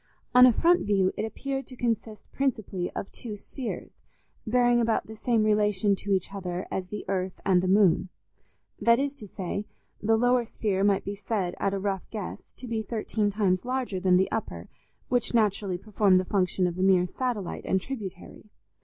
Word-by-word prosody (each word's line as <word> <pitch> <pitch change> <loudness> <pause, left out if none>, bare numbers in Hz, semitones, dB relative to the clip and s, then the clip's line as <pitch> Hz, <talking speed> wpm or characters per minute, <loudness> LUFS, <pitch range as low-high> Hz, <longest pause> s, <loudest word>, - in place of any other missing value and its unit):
On 250 0 +9
a - - +7
front 345 - +3
view 195 -2 +2
it - - -2
appeared 270 +4 -4
to 255 - -10
consist 225 -3 -3
principally 220 -9 -1
of 195 - -5
two 215 -4 -7
spheres, 250 +4 -6 0.6
bearing 240 +1 +4
about 225 -3 +1
the 220 +2 -9
same 225 0 +1
relation 210 -1 +2
to 205 - -5
each 190 +1 -1
other 180 -2 -4
as 185 -1 -3
the 210 - -6
earth 185 -1 -2
and 185 -2 +4
the 185 - -1
moon: 190 -2 +4 0.7
that 235 0 +5
is 280 +1 -1
to 255 -7 -10
say, 200 +2 -4 0.3
the 225 +1 +3
lower 245 +1 +3
sphere 200 -4 -1
might 200 -1 +3
be 200 - -3
said, 195 -3 -2
at 195 0 0
a - - -1
rough 195 -1 -3
guess, 210 -4 -7
to 255 - -10
be 225 -1 -1
thirteen 215 -1 -1
times 195 -3 +1
larger 250 -6 -2
than 180 -1 +4
the 190 - +1
upper 225 - -4 0.4
which 245 -1 0
naturally 205 -4 +1
performed 200 -1 +3
the 185 - -2
function 185 -1 +1
of 175 0 -2
a - - +1
mere 190 -2 +4
satellite 215 -1 -3
and 190 - +2
tributary. 200 -3 -8
205 Hz, 190 wpm, -27 LUFS, 190-230 Hz, 0.7 s, On